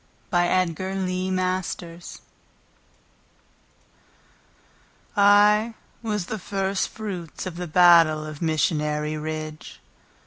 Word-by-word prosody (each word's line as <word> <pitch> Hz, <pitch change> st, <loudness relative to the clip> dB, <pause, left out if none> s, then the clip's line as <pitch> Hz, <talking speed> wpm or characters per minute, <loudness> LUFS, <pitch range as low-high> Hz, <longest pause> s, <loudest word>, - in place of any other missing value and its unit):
Knowlt 175 Hz, -1 st, +2 dB
Hoheimer 185 Hz, -2 st, -3 dB, 3.0 s
I 210 Hz, +2 st, +5 dB, 0.3 s
was 210 Hz, -5 st, -2 dB
the 220 Hz, +3 st, -5 dB
first 195 Hz, +1 st, -2 dB
fruits 190 Hz, -8 st, -6 dB
of 185 Hz, -2 st, -5 dB
the 180 Hz, 0 st, -5 dB
battle 165 Hz, -2 st, +5 dB
of 155 Hz, -1 st, -9 dB
Missionary 150 Hz, -1 st, 0 dB
Ridge. 155 Hz, 0 st, -6 dB
180 Hz, 75 wpm, -24 LUFS, 155-195 Hz, 3.0 s, I